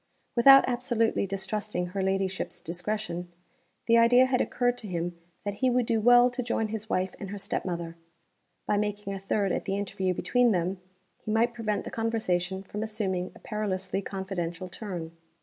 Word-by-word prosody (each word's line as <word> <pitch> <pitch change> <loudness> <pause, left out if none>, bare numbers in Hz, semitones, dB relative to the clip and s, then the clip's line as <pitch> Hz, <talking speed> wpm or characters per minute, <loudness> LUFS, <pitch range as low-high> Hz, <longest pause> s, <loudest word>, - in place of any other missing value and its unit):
Without 270 +3 +8
absolutely 240 -4 +1
distrusting 195 -1 -2
her 195 +2 -3
ladyship's 190 0 -1
discretion, 175 0 -4 0.5
the 230 0 +5
idea 245 +2 +6
had 260 -1 +1
occurred 245 0 +1
to 215 - -8
him 175 -1 -3 0.3
that 205 - -1
he 260 - +4
would 250 -1 +2
do 225 -1 +1
well 245 +2 +6
to 250 +1 -3
join 230 -2 -1
his 220 0 -5
wife 185 +1 0
and 195 - -6
her 205 - -5
step 200 +1 -3
mother. 170 -2 -4 0.7
By 205 - +1
making 205 -1 -2
a 195 - -4
third 195 0 0
at - - -2
the 195 - -1
interview 190 -2 -1
between 245 +2 +3
them, 180 +1 -1 0.4
he - - -8
might 230 +2 +2
prevent 215 -4 -2
the - - -7
conversation 190 -5 -1
from 205 +2 -6
assuming 200 -5 -2
a - - -13
perilously 195 -3 -2
confidential 185 -3 -4
turn. 175 -5 -6
205 Hz, 175 wpm, -28 LUFS, 185-225 Hz, 0.7 s, Without